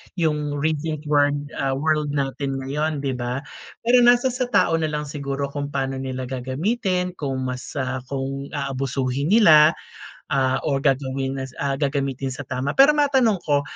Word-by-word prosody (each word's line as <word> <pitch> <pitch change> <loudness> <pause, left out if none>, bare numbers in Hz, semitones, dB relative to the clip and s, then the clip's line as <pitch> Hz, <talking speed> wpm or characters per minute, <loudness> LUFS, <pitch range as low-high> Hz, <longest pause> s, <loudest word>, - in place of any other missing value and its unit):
yung 150 -4 0
recent 155 +1 -2
word, 145 -1 +3 0.2
ah, 135 -1 0
world 150 0 0
natin 135 0 -2
ngayon, 150 +2 -2
di 135 - 0
ba? 125 +2 -3 0.4
Pero 245 +2 +5
nasa 245 +1 +5
sa 250 0 -2
tao 185 -8 +2
na 160 - 0
lang 150 -1 -3
siguro 140 -1 -4
kung 145 0 -3
paano 135 -2 -2
nila 130 -1 -4
gagamitin, 180 - -1
kung 135 -3 -2
mas, 125 +2 -5
ah, 130 -2 -2
kung 135 0 -4
aabusuhin 135 0 -2
nila, 155 -8 +7 0.6
ah, 130 -2 +2
or 140 -3 0
gagawin 135 -1 0
nas 130 -1 -6
ah, 140 -1 0
gagamitin 135 -2 -2
sa 135 - -6
tama. 130 +1 -3
Pero 275 +2 +7
matanong 265 -7 +3
ko, 145 -2 +2
140 Hz, 160 wpm, -23 LUFS, 135-155 Hz, 0.6 s, nila